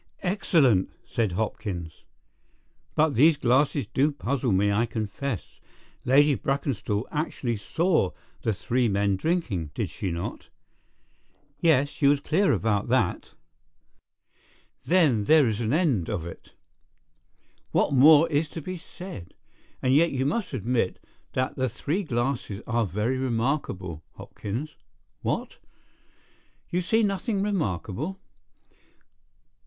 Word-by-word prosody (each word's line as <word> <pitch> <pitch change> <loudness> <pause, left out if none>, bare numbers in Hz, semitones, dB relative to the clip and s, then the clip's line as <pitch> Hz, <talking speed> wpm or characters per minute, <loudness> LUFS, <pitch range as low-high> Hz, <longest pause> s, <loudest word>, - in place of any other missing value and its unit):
"Excellent!" 155 - +3 0.2
said 110 -6 -1
Hopkins. 90 -5 -4 0.9
"But 155 -1 +3
these 150 +6 +5
glasses 135 +3 +2
do 145 +3 +1
puzzle 135 -3 -1
me, 100 +2 +3
I 115 +4 +1
confess. 110 +1 -4 0.5
Lady 145 +3 +5
Brackenstall 125 -3 -1
actually 135 -6 -2
saw 160 - +1 0.3
the 110 - 0
three 120 +4 0
men 100 -1 +1
drinking, 105 - -1
did - - -2
she 95 - -4
not?" 85 0 -5 1.1
"Yes; 145 -4 +4
she 140 - +1
was 145 0 +4
clear 180 +7 +2
about 105 -3 0
that." - - 0 1.5
"Then 150 - +3
there 155 -1 +5
is 110 0 -1
an 115 0 -1
end 145 - +1
of 95 -7 -3
it. 85 - -11 1.2
What - - +1
more 150 +4 +7
is 150 +1 +1
to 165 - -6
be 185 +4 -5
said? 175 - -10 0.5
And 130 0 +3
yet, 165 +4 +5
you 130 -1 -1
must 195 +8 -1
admit, 120 -5 -1 0.4
that 130 0 -1
the 130 -1 0
three 145 - -2
glasses 120 - -2
are 115 -2 0
very 110 +7 -1
remarkable, 115 - -2
Hopkins. 125 +10 -6 0.5
What? - - -2 1.1
You 180 - +1
see 220 +6 +2
nothing 200 0 0
remarkable? 155 - -2
130 Hz, 120 wpm, -26 LUFS, 105-155 Hz, 1.5 s, more